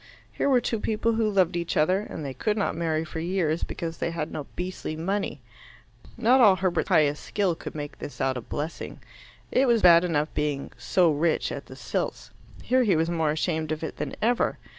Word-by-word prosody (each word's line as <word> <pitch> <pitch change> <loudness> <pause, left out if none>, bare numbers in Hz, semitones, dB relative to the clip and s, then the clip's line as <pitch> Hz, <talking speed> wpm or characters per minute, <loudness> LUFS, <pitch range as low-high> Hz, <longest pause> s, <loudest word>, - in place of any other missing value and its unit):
Here - - 0
were 255 -3 +4
two 225 - -1
people 220 +2 0
who 220 -1 +1
loved 185 -4 +2
each 170 -1 -2
other, 185 +5 +3
and 165 -7 -6
they 135 - -4
could 210 - -1
not 200 - 0
marry 160 -1 -1
for 160 - -6
years 170 -2 0
because 165 -2 -5
they - - -1
had 165 -2 -4
no 145 - -5
beastly 180 -3 -4
money. 180 -2 -2 0.8
Not 245 +3 +4
all 205 -5 +7
Herbert's 185 -1 0
pious 150 -1 +3
skill 195 -4 0
could 165 - -8
make 145 -1 -6
this 145 - -8
out 135 -1 +1
a 125 - -4
blessing. 150 +7 -5 0.5
It 265 +1 +3
was 235 -2 +3
bad 170 -1 +8
enough 155 -3 0
being 145 -2 -2
"so 175 -3 +2
rich" 155 +2 +1
at - - -6
the - - -10
Silts; - - -4 0.3
here 255 +1 +3
he 210 -7 +3
was 165 +2 +1
more 160 -2 +1
ashamed 160 0 -1
of 155 +1 -3
it - - -5
than - - -4
ever. 240 +2 +2
170 Hz, 205 wpm, -26 LUFS, 155-200 Hz, 0.8 s, bad